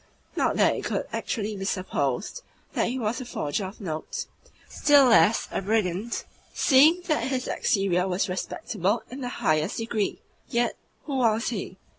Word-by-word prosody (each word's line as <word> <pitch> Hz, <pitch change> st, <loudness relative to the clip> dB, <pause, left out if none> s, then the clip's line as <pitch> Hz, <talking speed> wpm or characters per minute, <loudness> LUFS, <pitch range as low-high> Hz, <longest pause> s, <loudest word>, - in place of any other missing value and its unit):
not -, -, +1 dB
that -, -, +4 dB
it -, -, -5 dB
could -, -, -2 dB
actually 215 Hz, -2 st, -2 dB
be 195 Hz, -, -5 dB
supposed 185 Hz, -, -2 dB, 0.3 s
that -, -, +1 dB
he 250 Hz, -, -2 dB
was 235 Hz, +1 st, -2 dB
a -, -, -6 dB
forger 190 Hz, -3 st, -2 dB
of 190 Hz, +3 st, -9 dB
notes, 195 Hz, -, -4 dB, 0.4 s
still 290 Hz, -2 st, +5 dB
less 225 Hz, -3 st, +5 dB
a -, -, -1 dB
brigand, 210 Hz, +1 st, -1 dB, 0.3 s
seeing 310 Hz, +6 st, +5 dB
that 315 Hz, -4 st, 0 dB
his 260 Hz, -1 st, -2 dB
exterior 190 Hz, -2 st, +1 dB
was 185 Hz, +2 st, 0 dB
respectable 200 Hz, -, -2 dB
in 265 Hz, +2 st, -7 dB
the 245 Hz, -, -3 dB
highest 155 Hz, -8 st, 0 dB
degree. 225 Hz, -2 st, -2 dB, 0.3 s
Yet 240 Hz, -1 st, +1 dB, 0.3 s
who 280 Hz, -3 st, -3 dB
was 230 Hz, -3 st, +2 dB
he? 195 Hz, -4 st, -5 dB
220 Hz, 160 wpm, -26 LUFS, 185-255 Hz, 0.4 s, still